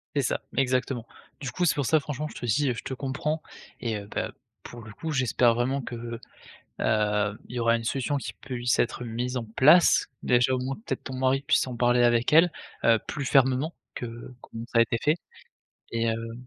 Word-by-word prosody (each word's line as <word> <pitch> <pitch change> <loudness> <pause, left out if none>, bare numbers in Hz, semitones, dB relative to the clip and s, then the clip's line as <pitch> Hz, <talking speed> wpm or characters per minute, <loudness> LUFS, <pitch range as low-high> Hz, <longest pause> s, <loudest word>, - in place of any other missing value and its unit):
C'est 140 - +3
ça - - -1 0.2
exactement. 130 -2 0 0.3
Du 135 -3 -4
coup 180 - 0
c'est 165 - +4
pour 140 -4 -1
ça 155 - +4
franchement 150 +1 -4
je - - -12
te 120 - -5
dis, 130 +5 +2
heu, - - +1
je 120 - -7
te - - -5
comprends 150 +4 -2 0.4
et 115 -3 -2
heu, 100 - -9
bah - - -3 0.3
pour 120 -1 -10
le 110 -1 -11
coup 160 +8 -5
j'espère 125 -4 +3
vraiment 130 +3 0
que, 120 - -6 0.9
heu, 105 -1 +1
il 125 - -9
y - - -1
aura 115 0 +3
une 115 - -3
solution 135 +4 -1
qui - - -5
puisse 125 -3 -2
être 120 +1 0
mise 120 +2 -3
en 115 - -3
place. 150 +10 +5 0.2
Déjà 125 +1 +3
au 130 - -1
moins 130 +2 -2
peut-être 220 - -5
ton 130 - -6
mari 130 +1 +1
puisse 155 -3 +3
en 125 - -5
parler 120 0 +3
avec 120 +2 +3
elle, 165 +2 +7 0.3
heu, 115 -1 +5
plus 145 -2 -4
fermement 135 +4 +3 0.2
que 120 - -5 0.3
comme 115 +1 -8
ça 115 - +5
a - - +8
été 115 0 +1
fait 150 +2 +4 0.8
et 115 0 0
heu 115 0 -3
125 Hz, 215 wpm, -27 LUFS, 115-140 Hz, 0.9 s, a